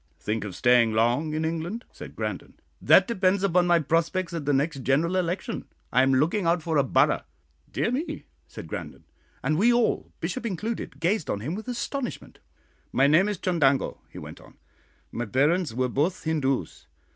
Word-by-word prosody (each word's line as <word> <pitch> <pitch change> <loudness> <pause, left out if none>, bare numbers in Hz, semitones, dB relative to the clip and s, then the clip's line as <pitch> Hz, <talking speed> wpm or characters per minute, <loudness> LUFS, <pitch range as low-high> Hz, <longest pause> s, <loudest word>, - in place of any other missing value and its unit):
"Think 110 0 -2
of 95 -4 -7
staying 120 -2 +4
long 120 +8 +1
in 160 +1 -1
England?" 165 +8 -3
said - - -11
Grandon. - - -5 0.3
"That - - +6
depends 195 -4 +1
upon 180 -2 +3
my 175 -1 +5
prospects 170 +4 0
at 165 -4 -4
the 145 - +2
next 140 +1 0
general 145 +8 +1
election. 180 +1 -2 0.3
I 125 - +5
am 135 0 +3
looking 165 +7 +1
out 170 -1 +2
for 160 -2 0
a - - +4
borough." 130 - +2 0.5
"Dear 220 - 0
me!" 285 +7 -3 0.2
said - - -9
Grandon; - - -7 0.4
and 155 +1 +1
we 235 +4 +5
all, 240 -1 +1
Bishop 180 +10 -3
included, 215 -6 -4
gazed 175 +1 0
on 100 - -2
him 145 +9 -3
with 220 +5 -6
astonishment. 250 +1 -5 0.5
"My 135 - +3
name 165 +8 +4
is 205 - -2
Chundango," 150 -7 +1
he - - -13
went - - -9
on. - - -18 0.5
"My 120 0 -4
parents 150 - +2
were 130 +3 0
both 150 +9 -1
Hindoos. 135 - -2
165 Hz, 180 wpm, -26 LUFS, 135-185 Hz, 0.5 s, That